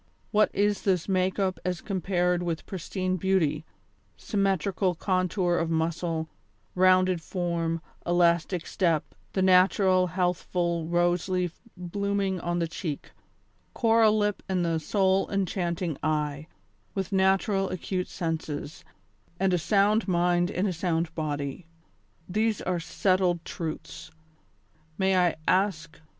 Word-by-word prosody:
what 215 Hz, 0 st, +4 dB
is 205 Hz, 0 st, +1 dB
this 185 Hz, -4 st, +1 dB
make 185 Hz, -1 st, +1 dB
up 190 Hz, -2 st, 0 dB
as 180 Hz, -1 st, -2 dB
compared 180 Hz, -2 st, 0 dB
with 170 Hz, -2 st, -3 dB
pristine 185 Hz, 0 st, -3 dB
beauty, 170 Hz, -5 st, +1 dB, 0.5 s
symmetrical 195 Hz, -2 st, 0 dB
contour 185 Hz, 0 st, 0 dB
of 165 Hz, -, -1 dB
muscle, 165 Hz, 0 st, -1 dB, 0.5 s
rounded 185 Hz, -1 st, +4 dB
form, 170 Hz, -2 st, -2 dB, 0.2 s
elastic 175 Hz, 0 st, +2 dB
step, 165 Hz, -5 st, 0 dB, 0.2 s
the 190 Hz, -, +1 dB
natural, 185 Hz, 0 st, +4 dB
healthful 175 Hz, -1 st, -1 dB
rose 175 Hz, +1 st, +1 dB
leaf 180 Hz, -2 st, -1 dB, 0.2 s
blooming 195 Hz, +1 st, -1 dB
on 175 Hz, 0 st, -2 dB
the 170 Hz, -1 st, 0 dB
cheek, 160 Hz, -2 st, -5 dB, 0.6 s
coral 225 Hz, -2 st, +4 dB
lip 205 Hz, -1 st, 0 dB
and 180 Hz, -2 st, +1 dB
the 165 Hz, -1 st, 0 dB
soul 190 Hz, +3 st, +1 dB
enchanting 180 Hz, -4 st, -1 dB
eye, 150 Hz, -1 st, -1 dB, 0.5 s
with 195 Hz, 0 st, -2 dB
naturally 195 Hz, 0 st, +2 dB
acute 185 Hz, 0 st, -3 dB
senses, 160 Hz, -3 st, -4 dB, 0.6 s
and 190 Hz, -1 st, +2 dB
a 180 Hz, -, +2 dB
sound 205 Hz, +5 st, +2 dB
mind 175 Hz, -1 st, +2 dB
in 190 Hz, 0 st, -1 dB
a 190 Hz, -, 0 dB
sound 165 Hz, -1 st, -1 dB
body! 145 Hz, 0 st, -4 dB, 0.6 s
These 215 Hz, +3 st, 0 dB
are 180 Hz, -1 st, -1 dB
settled 180 Hz, 0 st, +1 dB
truths. 160 Hz, -2 st, -6 dB, 0.9 s
May 190 Hz, 0 st, +2 dB
I 180 Hz, -2 st, +3 dB
ask. 185 Hz, -5 st, 0 dB
180 Hz, 120 wpm, -27 LUFS, 170-190 Hz, 0.9 s, what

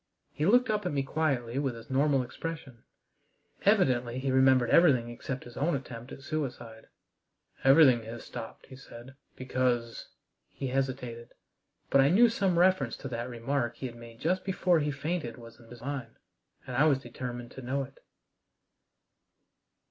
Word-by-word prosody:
He 150 Hz, -, -1 dB
looked 245 Hz, +2 st, +4 dB
up 210 Hz, -1 st, -1 dB
at -, -, -2 dB
me 140 Hz, -2 st, 0 dB
quietly 135 Hz, -4 st, -1 dB
with 135 Hz, -4 st, -1 dB
his 115 Hz, +3 st, -11 dB
normal 135 Hz, 0 st, +3 dB
expression. 130 Hz, -2 st, -7 dB, 0.8 s
Evidently 130 Hz, -, +3 dB
he 130 Hz, +1 st, -1 dB
remembered 130 Hz, -2 st, +4 dB
everything 130 Hz, -9 st, +5 dB
except 125 Hz, +2 st, -6 dB
his 120 Hz, -, -12 dB
own 155 Hz, +2 st, +1 dB
attempt 125 Hz, -2 st, -7 dB
at 135 Hz, -, -10 dB
suicide. 120 Hz, -7 st, -5 dB, 0.8 s
"Everything 135 Hz, -3 st, +6 dB
has 115 Hz, +1 st, -8 dB
stopped," 115 Hz, -, -9 dB
he 130 Hz, -, -12 dB
said, 130 Hz, -1 st, -12 dB, 0.2 s
"because 125 Hz, -2 st, -1 dB, 0.2 s
" -, -, -53 dB
He 135 Hz, -, -3 dB
hesitated. 125 Hz, -3 st, -3 dB, 0.6 s
But 140 Hz, -, +6 dB
I 135 Hz, -, +4 dB
knew 230 Hz, +8 st, +6 dB
some 195 Hz, -6 st, +1 dB
reference 185 Hz, +2 st, +3 dB
to -, -, -7 dB
that 120 Hz, 0 st, -4 dB
remark 120 Hz, 0 st, -2 dB
he -, -, -7 dB
had 120 Hz, -2 st, -6 dB
made 115 Hz, -1 st, -12 dB
just 185 Hz, +3 st, 0 dB
before 185 Hz, -3 st, +2 dB
he 150 Hz, 0 st, 0 dB
fainted 140 Hz, -4 st, -3 dB
was 115 Hz, -1 st, -13 dB
in 115 Hz, -, -17 dB
his 120 Hz, 0 st, -12 dB
mind, 130 Hz, -4 st, -5 dB, 0.5 s
and 125 Hz, -, -6 dB
I 145 Hz, +5 st, +4 dB
was 145 Hz, -4 st, +4 dB
determined 120 Hz, -1 st, -7 dB
to 130 Hz, -, -9 dB
know 135 Hz, +2 st, -2 dB
it. 135 Hz, +1 st, -13 dB
130 Hz, 165 wpm, -29 LUFS, 120-150 Hz, 0.8 s, Everything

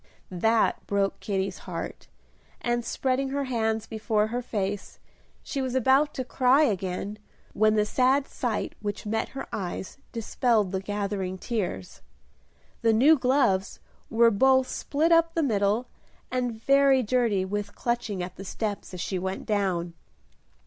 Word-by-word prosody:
That 220 Hz, +5 st, +1 dB
broke 200 Hz, -1 st, 0 dB
Kitty's 195 Hz, -2 st, -2 dB
heart; -, -, -6 dB, 0.5 s
and, 240 Hz, 0 st, -1 dB
spreading 265 Hz, +3 st, -1 dB
her 280 Hz, +1 st, -1 dB
hands 225 Hz, -4 st, -1 dB
before 220 Hz, -1 st, 0 dB
her 245 Hz, +2 st, -2 dB
face, 205 Hz, -4 st, -3 dB, 0.5 s
she 275 Hz, -, -3 dB
was 260 Hz, -1 st, -2 dB
about 265 Hz, +4 st, +4 dB
to 260 Hz, -, -3 dB
cry 260 Hz, +4 st, +4 dB
again, 195 Hz, -2 st, -2 dB, 0.3 s
when 215 Hz, 0 st, +3 dB
the 210 Hz, -1 st, +3 dB
sad 265 Hz, +5 st, +2 dB
sight 235 Hz, -4 st, -2 dB
which 205 Hz, 0 st, -4 dB
met 220 Hz, +1 st, -1 dB
her -, -, -4 dB
eyes 190 Hz, +4 st, -5 dB
dispelled 230 Hz, -3 st, +1 dB
the 190 Hz, -, -1 dB
gathering 195 Hz, -2 st, -3 dB
tears. 185 Hz, -, -4 dB, 0.8 s
The 225 Hz, -1 st, +4 dB
new 275 Hz, +9 st, +6 dB
gloves 250 Hz, -8 st, +1 dB, 0.3 s
were 230 Hz, 0 st, +5 dB
both 260 Hz, +4 st, +4 dB
split 315 Hz, +4 st, 0 dB
up 330 Hz, 0 st, +4 dB
the 330 Hz, -, +2 dB
middle 210 Hz, -1 st, +1 dB, 0.5 s
and 245 Hz, -3 st, -2 dB
very 275 Hz, +1 st, +4 dB
dirty 220 Hz, -5 st, +1 dB
with 205 Hz, +1 st, -4 dB
clutching 235 Hz, -6 st, -2 dB
at 180 Hz, 0 st, -8 dB
the 195 Hz, -, -7 dB
steps 205 Hz, -1 st, -4 dB
as 180 Hz, -, -5 dB
she 185 Hz, -, -2 dB
went 190 Hz, +1 st, -4 dB
down. 185 Hz, -5 st, 0 dB
220 Hz, 145 wpm, -27 LUFS, 200-255 Hz, 0.8 s, new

